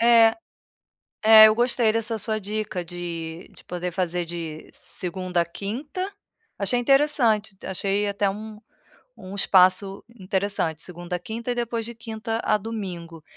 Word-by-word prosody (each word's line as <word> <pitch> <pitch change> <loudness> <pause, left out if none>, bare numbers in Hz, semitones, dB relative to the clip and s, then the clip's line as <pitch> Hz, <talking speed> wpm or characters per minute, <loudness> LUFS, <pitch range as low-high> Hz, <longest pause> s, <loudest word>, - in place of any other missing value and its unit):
É, 230 -1 +6 0.9
é 220 0 +10
eu 215 - +3
gostei 240 -2 +2
dessa 225 0 -1
sua 215 +1 -2
dica 205 -3 -3
de 170 -1 -6
de - - -17
poder 180 0 -4
fazer 175 -1 -1
de 165 -2 -7
segunda 180 -1 -3
à - - 0
quinta, 280 - -5 0.5
achei 205 +5 0
interessante, 245 -6 +3
achei 200 +2 -1
até 200 0 +1
um 210 +1 -7 0.6
um 185 +2 -9
espaço 195 0 +3
interessante, 190 -6 -2
segunda 175 0 -5
à - - -6
quinta 230 +6 -5
e - - -3
depois 235 -1 -2
de 235 - -8
quinta 225 0 -4
a - - +3
domingo, 180 -7 -6
200 Hz, 145 wpm, -24 LUFS, 180-225 Hz, 0.9 s, é